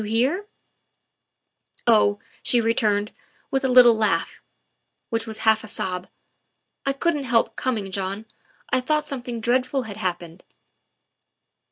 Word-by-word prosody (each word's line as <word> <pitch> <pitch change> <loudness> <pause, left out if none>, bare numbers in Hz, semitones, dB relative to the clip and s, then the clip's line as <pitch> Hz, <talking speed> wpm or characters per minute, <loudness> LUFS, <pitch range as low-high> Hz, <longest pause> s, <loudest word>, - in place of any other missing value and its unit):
"You 210 - -5
here?" 265 - 0 0.7
" - - -36
Oh," 210 -3 +4 0.2
she 245 - +3
returned, 215 -2 +1 0.4
with 270 0 0
a - - +2
little 250 -2 +7
laugh 215 -2 0 0.7
which 230 0 -1
was 220 -1 -6
half 220 0 +4
a - - -8
sob, 185 -2 -4 0.4
" - - -53
I - - +4
couldn't 290 0 -1
help 230 -2 +2
coming, 215 -7 -2
John. 195 +2 -3 0.5
I 255 - +3
thought 300 +3 0
something 245 -5 -5
dreadful 255 +3 0
had 210 -3 -8
happened." 175 -4 -4
230 Hz, 140 wpm, -23 LUFS, 210-255 Hz, 0.7 s, little